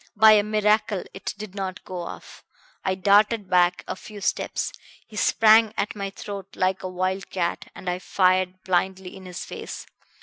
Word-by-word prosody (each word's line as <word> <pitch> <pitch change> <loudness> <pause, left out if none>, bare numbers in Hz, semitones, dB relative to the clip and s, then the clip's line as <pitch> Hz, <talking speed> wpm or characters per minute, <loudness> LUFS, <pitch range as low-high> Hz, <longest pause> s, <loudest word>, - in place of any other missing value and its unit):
By 220 +1 +8
a 210 -1 +7
miracle 210 -1 +1
it 190 - -5
did 210 -2 -8
not 190 -2 -5
go 185 -1 -6
off. 170 - -9 0.4
I 190 - 0
darted 205 +2 +3
back 180 0 +3
a - - -3
few 210 +2 -11
steps, 195 - -1 0.3
he 215 - -15
sprang 220 +1 +5
at 210 - -1
my 200 -1 -3
throat 195 -1 -8
like 185 0 0
a 185 - -4
wild 185 +1 -2
cat, 175 -2 -2
and 185 - -10
I 180 0 -1
fired 185 0 +1
blindly 185 0 -1
in 190 -1 -11
his 180 -1 -6
face. - - -7
190 Hz, 175 wpm, -24 LUFS, 185-210 Hz, 0.4 s, By